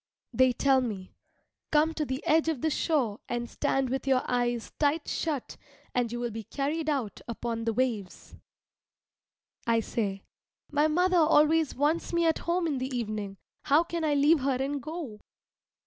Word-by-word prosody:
They 260 Hz, 0 st, +4 dB
tell 265 Hz, +1 st, +3 dB
me, 205 Hz, -7 st, -5 dB, 0.6 s
"Come 310 Hz, +1 st, +3 dB
to 310 Hz, -1 st, -2 dB
the 260 Hz, +1 st, -4 dB
edge 320 Hz, +1 st, +3 dB
of 300 Hz, -7 st, -2 dB
the 315 Hz, -, +1 dB
shore 265 Hz, -10 st, 0 dB
and 240 Hz, 0 st, -2 dB
stand 265 Hz, +1 st, -1 dB
with 265 Hz, +1 st, -2 dB
your 260 Hz, -1 st, +3 dB
eyes 240 Hz, -2 st, -1 dB
tight 295 Hz, +1 st, +1 dB
shut, 300 Hz, -6 st, -3 dB, 0.4 s
and 245 Hz, -2 st, 0 dB
you 240 Hz, -, -4 dB
will 240 Hz, -1 st, -2 dB
be 225 Hz, +1 st, -6 dB
carried 300 Hz, -, -2 dB
out 260 Hz, -9 st, -2 dB
upon 230 Hz, 0 st, -3 dB
the 230 Hz, -, +1 dB
waves." 225 Hz, -6 st, -2 dB, 1.3 s
I 230 Hz, -1 st, +3 dB
say, 200 Hz, -4 st, -3 dB, 0.5 s
"My 295 Hz, +1 st, +3 dB
mother 360 Hz, +4 st, +2 dB
always 315 Hz, -1 st, +4 dB
wants 300 Hz, +6 st, 0 dB
me 340 Hz, 0 st, +2 dB
at 325 Hz, -1 st, +2 dB
home 350 Hz, 0 st, +1 dB
in 290 Hz, -5 st, -1 dB
the 260 Hz, +1 st, -3 dB
evening 210 Hz, -4 st, -4 dB, 0.3 s
how 295 Hz, +4 st, +5 dB
can 340 Hz, -1 st, -4 dB
I 300 Hz, -2 st, +2 dB
leave 295 Hz, +3 st, +5 dB
her 270 Hz, 0 st, +1 dB
and 275 Hz, +1 st, -2 dB
go?" 300 Hz, -7 st, -6 dB
270 Hz, 170 wpm, -28 LUFS, 235-310 Hz, 1.3 s, how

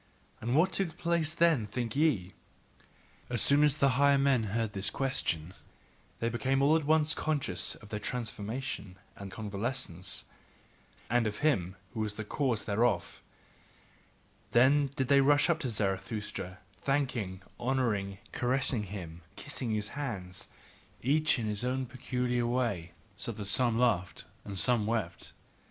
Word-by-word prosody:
And 120 Hz, +3 st, 0 dB
what 175 Hz, +5 st, +4 dB
took 175 Hz, -4 st, -2 dB
place 170 Hz, -2 st, +1 dB
then, 165 Hz, -10 st, +3 dB
think 115 Hz, +2 st, -3 dB
ye? 130 Hz, -, +2 dB, 1.0 s
As 120 Hz, -1 st, 0 dB
soon 140 Hz, +6 st, +7 dB
as 150 Hz, -1 st, +4 dB
the 140 Hz, -2 st, +4 dB
higher 140 Hz, +2 st, +4 dB
men 135 Hz, -4 st, +3 dB
heard 110 Hz, +1 st, -1 dB
his 100 Hz, 0 st, +1 dB
question, 90 Hz, -, -2 dB, 0.7 s
they 115 Hz, -, 0 dB
became 130 Hz, +4 st, +1 dB
all 150 Hz, +3 st, +5 dB
at 160 Hz, -2 st, +1 dB
once 155 Hz, 0 st, +4 dB
conscious 140 Hz, -, 0 dB
of 105 Hz, -, -15 dB
their 105 Hz, -1 st, -3 dB
transformation 110 Hz, -3 st, -4 dB, 0.2 s
and 100 Hz, -1 st, -8 dB
convalescence, 105 Hz, -3 st, -2 dB, 0.8 s
and 120 Hz, -1 st, +2 dB
of 105 Hz, +4 st, -4 dB
him 95 Hz, -, +1 dB, 0.2 s
who 115 Hz, -, -5 dB
was 105 Hz, -1 st, -1 dB
the 110 Hz, -, -4 dB
cause 115 Hz, -2 st, 0 dB
thereof: 105 Hz, -3 st, 0 dB, 1.3 s
then 140 Hz, +4 st, +5 dB
did 130 Hz, -, 0 dB
they 140 Hz, 0 st, +6 dB
rush 145 Hz, +4 st, +4 dB
up 165 Hz, -, 0 dB
to 135 Hz, -6 st, -2 dB
Zarathustra, 95 Hz, -2 st, -3 dB, 0.2 s
thanking, 125 Hz, -9 st, -1 dB, 0.2 s
honouring, 115 Hz, -7 st, 0 dB
caressing 125 Hz, -3 st, +1 dB
him, 90 Hz, -4 st, -7 dB
and -, -, -31 dB
kissing 140 Hz, -4 st, -3 dB
his 105 Hz, -1 st, -1 dB
hands, 100 Hz, -11 st, -5 dB, 0.6 s
each 155 Hz, +4 st, +3 dB
in 115 Hz, -, -2 dB
his 105 Hz, +1 st, -2 dB
own 130 Hz, +1 st, -1 dB
peculiar 125 Hz, -1 st, -1 dB
way; 115 Hz, -9 st, -1 dB, 0.2 s
so 100 Hz, -, -3 dB
that 105 Hz, -2 st, -6 dB
some 115 Hz, +3 st, +3 dB
laughed 105 Hz, -8 st, +1 dB, 0.2 s
and 100 Hz, -1 st, -6 dB
some 110 Hz, +1 st, +2 dB
wept. 110 Hz, -7 st, -2 dB
120 Hz, 145 wpm, -31 LUFS, 100-135 Hz, 1.3 s, soon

